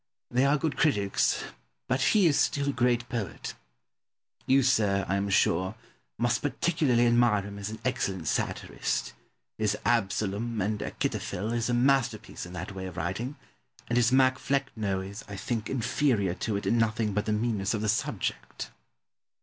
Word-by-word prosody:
They 125 +2 +3
are 145 +2 +4
good 145 -2 -2
critics, 105 -10 +2 0.4
but 130 - +1
he 205 +4 +4
is 150 -4 +4
still 140 -1 +1
a - - 0
great 120 -1 +1
poet. 110 -9 -4 0.9
You, 135 +1 +5
sir, 100 -6 +2
I 95 - +1
am 100 0 -1
sure, 95 +1 +2 0.4
must 120 -1 +1
particularly 145 -5 +2
admire 120 -4 +4
him 100 0 -8
as 100 0 -4
an 110 - -6
excellent 100 -9 -1
satirist; - - -1 0.5
his 105 -1 +1
"Absalom 110 +1 0
and 105 +2 0
Achitophel" 105 +5 -2
is 120 0 0
a 120 - +2
masterpiece 120 -7 +1
in 90 - -11
that 90 +2 -5
way 95 -1 -5
of 90 - -9
writing, 105 - -3 0.5
and 120 - +1
his 120 0 +4
"Mac 130 0 +4
Flecno" 110 -8 -1
is, 100 +2 -8
I 100 - -7
think, 110 +3 -3
inferior 120 -6 +1
to 105 +3 -2
it 100 - -3
in 115 - +2
nothing 110 -1 +1
but 105 +1 0
the - - +1
meanness 105 -1 0
of 105 - -2
the 110 - -1
subject. 105 - -2
110 Hz, 165 wpm, -28 LUFS, 100-125 Hz, 0.9 s, You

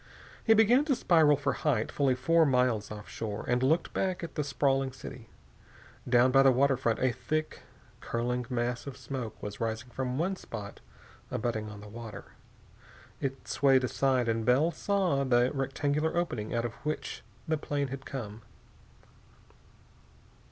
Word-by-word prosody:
He 225 - +5
began 230 +5 +5
to 285 -4 +2
spiral 155 - +4
for 145 0 0
height 130 -8 0
fully 135 -3 +2
four 165 +6 +3
miles 125 -6 +2
offshore, 105 0 -6
and 125 0 +1
looked 155 +6 +1
back 185 -2 -1
at 165 - -6
the 150 - -1
sprawling 135 -1 +1
city. 130 -3 -10 0.8
Down 125 +1 +5
by 135 +1 +6
the 135 - +6
waterfront 130 -3 +2
a 130 -1 +2
thick, 150 +6 -3 0.4
curling 120 +1 -2
mass 120 0 -2
of 135 -2 -7
smoke 120 -5 -6
was 105 0 -6
rising 115 +2 -3
from 130 0 -3
one 185 +5 0
spot 105 - -8 0.5
abutting 110 -2 -2
on 105 -1 -10
the 105 - -10
water. 115 +1 -9 0.9
It 135 0 -4
swayed 135 -2 +3
aside 130 -1 +1
and 115 0 0
Bell 135 +8 +3
saw 185 -8 +1
the 125 -1 +3
rectangular 145 +4 -1
opening 120 -12 -2
out 120 0 0
of 120 - -3
which 155 0 -3 0.3
the 160 -1 0
plane 145 -2 -2
had 135 +1 -6
come. 115 -6 -6
130 Hz, 150 wpm, -30 LUFS, 120-145 Hz, 0.9 s, by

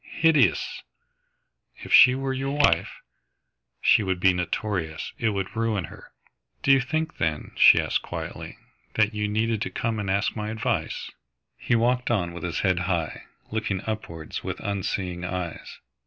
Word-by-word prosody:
"Hideous!" 160 -2 +2 0.9
"If - - -6
she 125 0 +8
were 135 0 -2
your 135 +2 -2
wife 145 - +3 0.5
?" - - -54
"She - - +5
would 95 -3 -1
be 95 0 +4
notorious. 90 -2 -3
It 115 - +2
would 95 -3 -3
ruin 110 -4 0
her." 75 - -12 0.5
"Do 135 - +4
you 135 0 +6
think, 155 +5 -2
then," 80 -2 -2
she - - +7
asked - - 0
quietly, - - -7 0.4
"that 105 -1 +2
you 105 0 -1
needed 110 +1 0
to 130 - -1
come 115 -2 -2
and 100 -2 -3
ask 100 +2 0
my 105 -1 -3
advice?" 110 0 -2 0.4
He 120 - 0
walked 125 +2 +1
on 90 -7 0
with 85 - -8
his 85 0 -2
head 95 -3 +2
high, 85 -4 -2 0.3
looking 110 -4 -2
upwards 85 -8 -5
with - - -4
unseeing 95 -3 -3
eyes. 90 -2 -5
105 Hz, 160 wpm, -25 LUFS, 90-115 Hz, 0.9 s, she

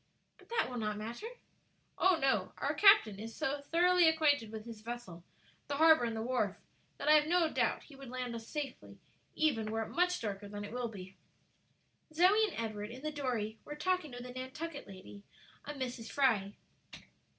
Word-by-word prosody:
"But - - -20
that 465 - +1
will 250 -1 -5
not 210 -1 -2
matter?" 230 - -6 0.7
"Oh, 370 -2 +4
no; 270 -2 +1
our - - -1
captain 395 - +6
is 225 +1 -7
so 280 +1 -2
thoroughly 350 +3 +4
acquainted 290 -8 +2
with 220 0 -7
his 230 -2 -9
vessel, 220 -7 -7 0.4
the 285 - -2
harbor 315 -4 +6
and 230 -1 -2
the 220 - -3
wharf, 230 -6 0 0.4
that - - -5
I - - +7
have 300 0 +5
no 345 -1 +3
doubt - - +1
he 285 - -15
would 270 -2 -10
land 250 -1 -4
us 230 -1 -7
safely 290 -3 -6 0.4
even 245 -9 +1
were 225 +1 -1
it - - -8
much 360 +2 +1
darker 205 -2 -4
than 205 0 -6
it 205 - -9
will 245 -1 -2
be." 190 -3 -10 0.9
Zoe 370 +7 +5
and 380 - -5
Edward, 215 -2 -4
in 255 +4 -10
the 305 - -2
dory, 240 -7 -3
were 295 - -7
talking 365 +1 0
with 245 -1 -8
a 250 - -7
Nantucket 270 +5 -6
lady, 195 +1 -11 0.4
a 295 - -6
Mrs. 250 -4 -5
Fry. 215 -8 +2
255 Hz, 190 wpm, -33 LUFS, 220-305 Hz, 0.9 s, I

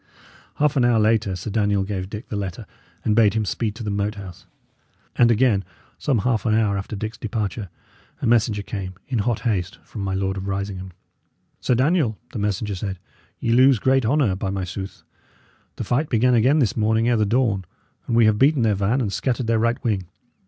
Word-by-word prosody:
Half 150 0 +2
an 130 - +4
hour 120 -1 +4
later, 110 -3 +2
Sir 100 +4 -5
Daniel 100 -2 +1
gave 95 -2 -4
Dick 105 +3 -8
the - - -4
letter, 95 -3 -4 0.4
and 105 - +2
bade 110 -2 +4
him 110 -1 +1
speed 105 +1 -2
to 115 - -7
the 105 - -2
Moat 100 +1 -1
House. 95 -2 -10 0.7
And, 120 - +5
again, 115 -4 +3 0.4
some 135 -5 +1
half 115 -5 +1
an 110 -2 +2
hour 110 -3 +2
after 100 +2 -4
Dick's 110 +2 -5
departure, 105 -2 -3 0.5
a - - -3
messenger 110 -3 +2
came, 95 -3 -5
in 125 -4 -1
hot 110 +2 0
haste, 100 -3 -1
from 105 - -8
my 95 -1 -2
Lord 95 0 -1
of 95 +1 -5
Risingham. 95 -1 -4 0.7
"Sir 125 - +1
Daniel," 130 - +2 0.2
the 115 - -3
messenger 105 0 -1
said, 95 0 -4 0.4
"ye 115 - -1
lose 130 +1 +6
great 130 +4 +2
honour, 120 -4 +2
by 95 +1 -3
my 95 -1 -2
sooth! 95 +2 -7 0.7
The - - -4
fight 145 +5 0
began 125 +2 +3
again 125 +6 +4
this 120 -9 +2
morning 110 +1 +2
ere 120 -1 +3
the 110 - +3
dawn, 105 -3 +1 0.4
and 115 - 0
we 115 -1 +6
have 110 -1 +3
beaten 140 -2 +4
their 110 -2 +3
van 100 +7 +1
and 100 -5 -2
scattered 125 -2 -1
their 115 0 +2
right 115 +2 +1
wing. 100 -6 -1
110 Hz, 205 wpm, -23 LUFS, 100-120 Hz, 0.7 s, lose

